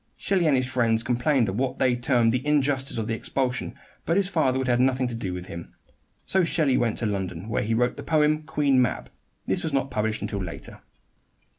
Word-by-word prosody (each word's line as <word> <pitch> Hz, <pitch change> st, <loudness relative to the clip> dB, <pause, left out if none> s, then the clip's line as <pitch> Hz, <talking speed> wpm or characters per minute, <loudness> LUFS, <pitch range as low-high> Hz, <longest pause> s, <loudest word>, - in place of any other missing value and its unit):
Shelley 185 Hz, -4 st, +1 dB
and 140 Hz, -3 st, +4 dB
his 130 Hz, -, +1 dB
friends 115 Hz, -3 st, +1 dB
complained 120 Hz, +1 st, +1 dB
at 95 Hz, -, -2 dB
what 130 Hz, +4 st, -1 dB
they 125 Hz, -2 st, +2 dB
termed 120 Hz, -2 st, +2 dB
the 125 Hz, +2 st, -1 dB
injustice 140 Hz, -3 st, 0 dB
of 110 Hz, -, -1 dB
the 115 Hz, -, -2 dB
expulsion; 125 Hz, +1 st, -2 dB, 0.3 s
but 165 Hz, -, +1 dB
his 200 Hz, -2 st, +2 dB
father 145 Hz, -8 st, +1 dB
would 130 Hz, -1 st, -1 dB
have 120 Hz, -1 st, +2 dB
nothing 130 Hz, 0 st, +2 dB
to 120 Hz, -, -3 dB
do 115 Hz, -5 st, -4 dB
with 90 Hz, 0 st, -5 dB
him. 85 Hz, -3 st, -9 dB, 0.5 s
So 190 Hz, -1 st, +2 dB
Shelley 155 Hz, -6 st, +2 dB
went 115 Hz, -3 st, +1 dB
to 120 Hz, -, -1 dB
London, 95 Hz, -3 st, -3 dB
where -, -, 0 dB
he 115 Hz, +2 st, 0 dB
wrote 125 Hz, +2 st, +1 dB
the -, -, -5 dB
poem 155 Hz, -1 st, +2 dB
"Queen 145 Hz, -4 st, +2 dB
Mab." 120 Hz, -, -1 dB, 0.3 s
This -, -, 0 dB
was 160 Hz, -, -3 dB
not 135 Hz, -1 st, 0 dB
published 110 Hz, -2 st, -1 dB
until 100 Hz, -2 st, -3 dB
later. 85 Hz, -2 st, -8 dB
125 Hz, 220 wpm, -25 LUFS, 115-140 Hz, 0.5 s, and